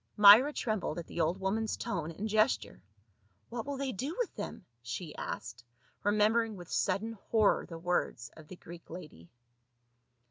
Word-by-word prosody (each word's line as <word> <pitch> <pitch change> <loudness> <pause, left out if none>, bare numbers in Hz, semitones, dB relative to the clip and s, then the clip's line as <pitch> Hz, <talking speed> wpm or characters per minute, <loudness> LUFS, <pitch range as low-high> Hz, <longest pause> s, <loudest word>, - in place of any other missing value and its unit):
Myra 210 +7 +9
trembled 215 - -2
at 170 - -5
the - - -3
old 170 +4 +1
woman's 215 +3 -1
tone 165 -3 -3
and 195 +6 -4
gesture. 110 - +1 0.7
"What 235 +2 -5
will 285 -1 -3
they 270 -1 -2
do 270 - -4
with 485 -5 -1
them?" 185 - -6 0.2
she 125 +7 -6
asked, 115 +2 -6 0.4
remem 210 +1 +4
bering 225 -2 +1
with 175 -2 -11
sudden 200 +4 0 0.2
horror 215 -3 +3
the 165 - -7
words 170 -8 -1
of 155 -1 -14
the 185 - -9
Greek 175 -1 -12
lady. 150 - -10
190 Hz, 165 wpm, -32 LUFS, 165-220 Hz, 0.7 s, Myra